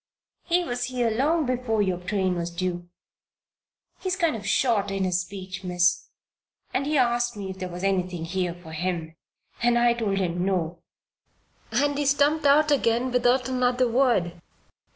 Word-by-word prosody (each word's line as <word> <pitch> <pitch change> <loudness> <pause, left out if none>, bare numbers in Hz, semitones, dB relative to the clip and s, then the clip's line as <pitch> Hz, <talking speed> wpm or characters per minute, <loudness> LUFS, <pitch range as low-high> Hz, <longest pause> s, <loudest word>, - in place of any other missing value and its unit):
He 355 +1 +1
was 245 -5 -2
here 245 -2 0
long 295 +7 +1
before 245 -4 0
your 185 -2 -1
train 185 0 -1
was 170 -1 -3
due. 175 0 -4 1.1
He's 370 -1 -1
kind 335 -7 +1
of 205 -3 -6
short 215 -3 +2
in 195 -1 -1
his 180 -1 +1
speech, 190 +1 -8
Miss. 180 -1 +1 0.7
And 275 +2 0
he 300 0 +1
asked 240 -2 +1
me 195 -2 -5
if 190 - -10
there 185 0 -4
was 175 +1 -7
anything 180 -3 -1
here 175 0 -2
for 175 -2 -12
him, 165 -1 -3 0.5
and 240 0 +3
I 240 0 +4
told 215 -5 -1
him 175 -2 -1
no. 180 -3 -1 0.9
And 285 +5 +1
he 290 - 0
stumped 290 +2 +3
out 300 +2 +5
again 250 -2 +2
without 250 +1 +2
another 250 -1 +1
word. 230 -9 +1
220 Hz, 165 wpm, -25 LUFS, 180-255 Hz, 1.1 s, out